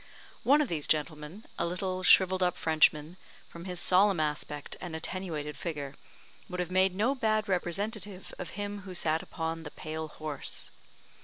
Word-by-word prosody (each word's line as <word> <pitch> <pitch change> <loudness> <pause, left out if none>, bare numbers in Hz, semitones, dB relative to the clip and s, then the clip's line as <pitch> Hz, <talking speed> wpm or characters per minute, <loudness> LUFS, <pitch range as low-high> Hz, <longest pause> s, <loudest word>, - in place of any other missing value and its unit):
One 290 +3 +5
of 295 - +1
these 155 -7 -2
gentlemen 155 +5 -1
a - - +2
little, 185 +1 -2
shrivelled 185 0 +6
up 180 -1 +2
Frenchman 155 +1 +3 0.3
from 170 +1 -10
his 180 -2 -3
solemn 190 0 +5
aspect 150 -1 -2
and 175 -3 -5
attenuated 160 -3 -3
figure, 145 -5 -4 0.6
would 180 -1 -4
have 180 0 -2
made 185 0 +4
no 225 +7 +2
bad 215 -5 +1
representative 195 +2 -2
of 180 - -4
him 205 0 -3
who 185 -2 -8
sat 160 -2 +1
upon 165 -1 -3
the 155 - -7
pale 155 +1 -5
horse. 155 -2 -4
180 Hz, 160 wpm, -30 LUFS, 155-190 Hz, 0.6 s, shrivelled